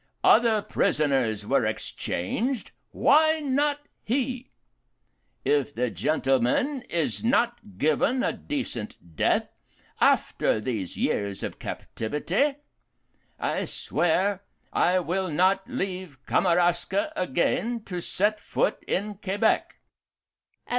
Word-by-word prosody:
Other 220 Hz, -2 st, +5 dB
prisoners 135 Hz, -, +1 dB
were -, -, +2 dB
exchanged 235 Hz, -, -2 dB, 0.2 s
why 315 Hz, +2 st, +4 dB
not 290 Hz, +1 st, 0 dB, 0.2 s
he? 255 Hz, +1 st, -2 dB, 1.0 s
If 145 Hz, -1 st, +1 dB
the 125 Hz, -1 st, 0 dB
gentleman 150 Hz, -, +1 dB
is 170 Hz, +4 st, -1 dB
not 235 Hz, -, 0 dB
given 155 Hz, -, +2 dB
a -, -, +1 dB
decent 190 Hz, -, -4 dB, 0.2 s
death, -, -, 0 dB, 0.4 s
after -, -, +2 dB
these 105 Hz, -5 st, -4 dB
years 100 Hz, -1 st, -1 dB
of -, -, -5 dB
captivity, 175 Hz, -, -2 dB, 0.8 s
I -, -, -1 dB
swear 185 Hz, +3 st, 0 dB, 0.3 s
I 180 Hz, +1 st, +3 dB
will 185 Hz, +1 st, -1 dB
not 190 Hz, +7 st, +2 dB
leave 185 Hz, -, -4 dB
Kamaraska 175 Hz, +2 st, +1 dB
again 210 Hz, -, 0 dB
to 180 Hz, -4 st, -5 dB
set 210 Hz, +5 st, +1 dB
foot -, -, -1 dB
in 205 Hz, +1 st, -2 dB
Quebec. 205 Hz, +3 st, 0 dB
185 Hz, 100 wpm, -26 LUFS, 145-240 Hz, 1.0 s, Other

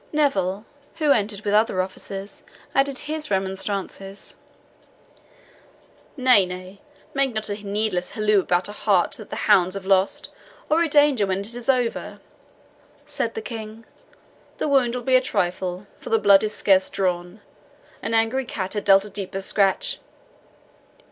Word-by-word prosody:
Neville, 205 Hz, -10 st, 0 dB, 0.3 s
who 305 Hz, -3 st, +2 dB
entered 205 Hz, -4 st, +1 dB
with 205 Hz, -, 0 dB
other 210 Hz, -3 st, +3 dB
officers, 195 Hz, +1 st, -5 dB, 0.3 s
added 275 Hz, 0 st, +2 dB
his 305 Hz, 0 st, -4 dB
remonstrances. 195 Hz, 0 st, -3 dB, 1.8 s
"Nay, 255 Hz, -6 st, +6 dB
nay, 185 Hz, +2 st, -9 dB, 0.3 s
make 275 Hz, -4 st, 0 dB
not 215 Hz, 0 st, -2 dB
a 205 Hz, +1 st, -5 dB
needless 200 Hz, -3 st, -1 dB
halloo 215 Hz, -1 st, +2 dB
about 180 Hz, -1 st, +1 dB
a -, -, -7 dB
hart 200 Hz, -4 st, +1 dB
that 215 Hz, -, -11 dB
the -, -, -5 dB
hounds 185 Hz, -2 st, +4 dB
have 195 Hz, -1 st, -6 dB
lost, 190 Hz, 0 st, +1 dB, 0.4 s
or 320 Hz, +2 st, +4 dB
a 335 Hz, -, +2 dB
danger 290 Hz, -8 st, +4 dB
when 190 Hz, +1 st, -1 dB
it 210 Hz, +4 st, -2 dB
is 245 Hz, +2 st, -6 dB
over," 250 Hz, -3 st, 0 dB, 0.9 s
said -, -, -3 dB
the 450 Hz, -, -4 dB
King. 225 Hz, -, -8 dB, 0.7 s
"The -, -, -1 dB
wound 260 Hz, -4 st, +2 dB
will 250 Hz, -, -4 dB
be 260 Hz, +1 st, +3 dB
a 255 Hz, -, +6 dB
trifle, 180 Hz, -5 st, -2 dB
for -, -, -9 dB
the 225 Hz, -, +4 dB
blood 200 Hz, -2 st, +5 dB
is 215 Hz, 0 st, -2 dB
scarce 190 Hz, -2 st, +3 dB
drawn 180 Hz, +1 st, -2 dB, 0.6 s
an 225 Hz, -, -1 dB
angry 225 Hz, +4 st, +2 dB
cat 190 Hz, -5 st, -4 dB
had 205 Hz, -1 st, -3 dB
dealt 195 Hz, 0 st, +6 dB
a -, -, -8 dB
deeper 195 Hz, -1 st, -5 dB
scratch. 200 Hz, -, +1 dB
205 Hz, 155 wpm, -23 LUFS, 195-245 Hz, 1.8 s, Nay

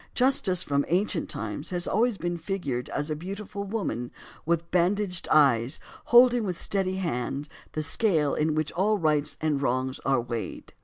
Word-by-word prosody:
Justice 230 Hz, -9 st, +3 dB
from 140 Hz, 0 st, +1 dB
ancient 180 Hz, 0 st, 0 dB
times 110 Hz, +7 st, -4 dB
has 175 Hz, -1 st, -1 dB
always 225 Hz, +1 st, +2 dB
been 175 Hz, -1 st, -2 dB
figured 170 Hz, -9 st, -3 dB
as 145 Hz, +2 st, -2 dB
a -, -, 0 dB
beautiful 200 Hz, +4 st, -6 dB
woman, 185 Hz, -, -3 dB, 0.4 s
with 170 Hz, 0 st, 0 dB
bandaged 180 Hz, +1 st, +1 dB
eyes, 135 Hz, -3 st, +4 dB, 0.3 s
holding 245 Hz, 0 st, +6 dB
with 180 Hz, -4 st, -3 dB
steady 190 Hz, -2 st, 0 dB
hand 145 Hz, -5 st, -2 dB, 0.3 s
the 155 Hz, -, -2 dB
scale 160 Hz, -6 st, +1 dB
in 155 Hz, 0 st, +1 dB
which 155 Hz, -1 st, 0 dB
all 210 Hz, +4 st, +1 dB
rights 150 Hz, -4 st, +1 dB
and 150 Hz, -3 st, 0 dB
wrongs 130 Hz, 0 st, -1 dB
are 135 Hz, -2 st, +1 dB
weighed. 120 Hz, -1 st, -5 dB
170 Hz, 160 wpm, -27 LUFS, 145-195 Hz, 0.4 s, holding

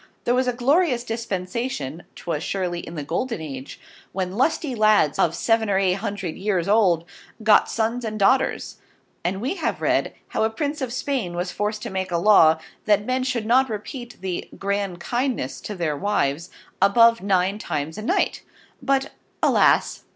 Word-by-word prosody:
There 240 Hz, -, +2 dB
was 255 Hz, +1 st, +1 dB
a 250 Hz, -, +1 dB
glorious 260 Hz, +1 st, +2 dB
Dispensation 200 Hz, -, -4 dB
('twas 160 Hz, -4 st, -3 dB
surely 180 Hz, -1 st, -2 dB
in 170 Hz, -, -8 dB
the 150 Hz, -, -4 dB
Golden 205 Hz, -, -2 dB
Age) 140 Hz, -4 st, -7 dB, 0.3 s
when 185 Hz, -1 st, -2 dB
Lusty 265 Hz, -, 0 dB
Ladds 215 Hz, -9 st, +3 dB
of 165 Hz, 0 st, +2 dB
seven 225 Hz, +5 st, +1 dB
or 195 Hz, -, +2 dB
eight 190 Hz, -2 st, +3 dB
hundred 200 Hz, -5 st, -4 dB
years 190 Hz, -3 st, -1 dB
old, 190 Hz, -6 st, +3 dB, 0.4 s
Got 215 Hz, -1 st, +5 dB
Sons 230 Hz, +2 st, -1 dB
and 215 Hz, -1 st, -3 dB
Daughters; 255 Hz, +6 st, +1 dB, 0.5 s
and 185 Hz, +3 st, -1 dB
we 265 Hz, -, -2 dB
have -, -, -2 dB
read, -, -, 0 dB
how 220 Hz, -, 0 dB
a 220 Hz, -, +2 dB
Prince 290 Hz, +5 st, -3 dB
of 255 Hz, -3 st, -2 dB
Spain 245 Hz, -8 st, -2 dB
was 180 Hz, +1 st, -2 dB
forced 210 Hz, +2 st, -2 dB
to 235 Hz, -, -5 dB
make 190 Hz, -1 st, -3 dB
a 170 Hz, -, +1 dB
Law, 170 Hz, -4 st, +6 dB, 0.3 s
that 205 Hz, -1 st, +3 dB
Men 255 Hz, +2 st, 0 dB
should 250 Hz, -4 st, -1 dB
not 255 Hz, +3 st, +3 dB
Repeat 240 Hz, +3 st, -6 dB
the 185 Hz, -2 st, -4 dB
Grand 200 Hz, -2 st, -2 dB
Kindness 240 Hz, -, -2 dB
to 210 Hz, -, -6 dB
their 165 Hz, -5 st, -1 dB
Wives, 170 Hz, -3 st, -1 dB, 0.3 s
above 230 Hz, +4 st, +5 dB
NINE 195 Hz, +1 st, +1 dB
times 155 Hz, -4 st, -3 dB
in 215 Hz, -, -6 dB
a -, -, -4 dB
night: -, -, +1 dB, 0.4 s
But 270 Hz, 0 st, 0 dB, 0.3 s
Alas! -, -, +3 dB
205 Hz, 175 wpm, -23 LUFS, 180-240 Hz, 0.5 s, Law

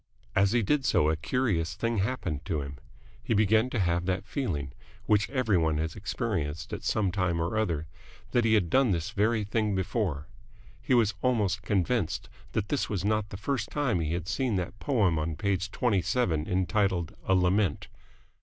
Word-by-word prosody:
As 95 Hz, 0 st, +4 dB
he 120 Hz, -1 st, +2 dB
did 140 Hz, +7 st, +1 dB
so 75 Hz, -10 st, +3 dB
a -, -, +1 dB
curious 90 Hz, -, 0 dB
thing 115 Hz, -2 st, -1 dB
happened 95 Hz, -, -2 dB
to 85 Hz, -5 st, -1 dB
him. 70 Hz, -1 st, -7 dB, 0.4 s
He 115 Hz, -, 0 dB
began 110 Hz, +3 st, +3 dB
to 120 Hz, -, -2 dB
have 85 Hz, -1 st, +1 dB
that 95 Hz, +1 st, -1 dB
feeling, 80 Hz, -, -3 dB, 0.3 s
which 105 Hz, -1 st, +2 dB
every 120 Hz, -9 st, +2 dB
one 80 Hz, -2 st, +1 dB
has 80 Hz, 0 st, -2 dB
experienced 75 Hz, +2 st, -3 dB
at -, -, -5 dB
some 100 Hz, -4 st, +1 dB
time 90 Hz, -3 st, 0 dB
or 85 Hz, +5 st, -1 dB
other, 85 Hz, -8 st, 0 dB, 0.5 s
that 120 Hz, -, +3 dB
he 110 Hz, -1 st, +4 dB
had 90 Hz, -6 st, +1 dB
done 135 Hz, -2 st, +4 dB
this 85 Hz, -4 st, -1 dB
very 110 Hz, +1 st, +1 dB
thing 105 Hz, 0 st, 0 dB
before. 95 Hz, -, -1 dB, 0.6 s
He 130 Hz, -, +2 dB
was 110 Hz, -3 st, +3 dB
almost 105 Hz, -7 st, +1 dB
convinced 95 Hz, -3 st, 0 dB, 0.2 s
that 105 Hz, -2 st, -1 dB
this 145 Hz, -, 0 dB
was 100 Hz, -3 st, -2 dB
not 105 Hz, -1 st, +1 dB
the 100 Hz, -, -7 dB
first 115 Hz, +1 st, -2 dB
time 130 Hz, -11 st, 0 dB
he 80 Hz, -1 st, -1 dB
had 85 Hz, -1 st, -3 dB
seen 125 Hz, 0 st, 0 dB
that 90 Hz, +2 st, -3 dB
poem 100 Hz, -, +2 dB
on 80 Hz, 0 st, -2 dB
page 100 Hz, +1 st, -1 dB
twenty 105 Hz, -3 st, +1 dB
seven 85 Hz, -10 st, 0 dB
entitled 95 Hz, -2 st, 0 dB
"A 95 Hz, -, +4 dB
Lament." 90 Hz, -2 st, +1 dB
100 Hz, 185 wpm, -28 LUFS, 85-110 Hz, 0.6 s, As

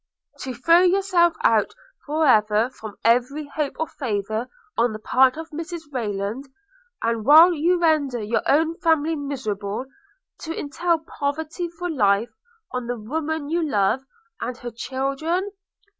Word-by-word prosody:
'To 260 Hz, -2 st, -5 dB
throw 330 Hz, +8 st, +5 dB
yourself 365 Hz, -2 st, +3 dB
out 220 Hz, -2 st, +3 dB, 0.3 s
for 310 Hz, +2 st, +1 dB
ever 215 Hz, -1 st, +3 dB
from 215 Hz, -4 st, -10 dB
every 250 Hz, +6 st, +2 dB
hope 300 Hz, -3 st, -3 dB
of 320 Hz, -, -2 dB
favour 220 Hz, -2 st, -3 dB, 0.3 s
on 235 Hz, -1 st, +2 dB
the -, -, -5 dB
part 255 Hz, +5 st, +3 dB
of 320 Hz, 0 st, -7 dB
Mrs 330 Hz, +2 st, -6 dB
Rayland; 215 Hz, 0 st, -3 dB, 0.6 s
and 230 Hz, -1 st, 0 dB
while 315 Hz, +8 st, +8 dB
you 345 Hz, +3 st, +2 dB
render 305 Hz, -7 st, +2 dB
your 220 Hz, +2 st, -1 dB
own 320 Hz, +3 st, +2 dB
family 320 Hz, -1 st, +2 dB
miserable, 250 Hz, -7 st, -4 dB, 0.5 s
to 325 Hz, 0 st, -5 dB
entail 335 Hz, +4 st, 0 dB, 0.2 s
poverty 310 Hz, +4 st, -2 dB
for 345 Hz, +1 st, -5 dB
life, 215 Hz, -, +2 dB, 0.4 s
on 250 Hz, -2 st, -4 dB
the 245 Hz, 0 st, -2 dB
woman 310 Hz, +6 st, -3 dB
you 340 Hz, +2 st, +1 dB
love, 230 Hz, -5 st, +1 dB, 0.4 s
and 250 Hz, -, -4 dB
her 240 Hz, 0 st, -7 dB
children?' 275 Hz, -, -2 dB
280 Hz, 145 wpm, -23 LUFS, 230-320 Hz, 0.6 s, while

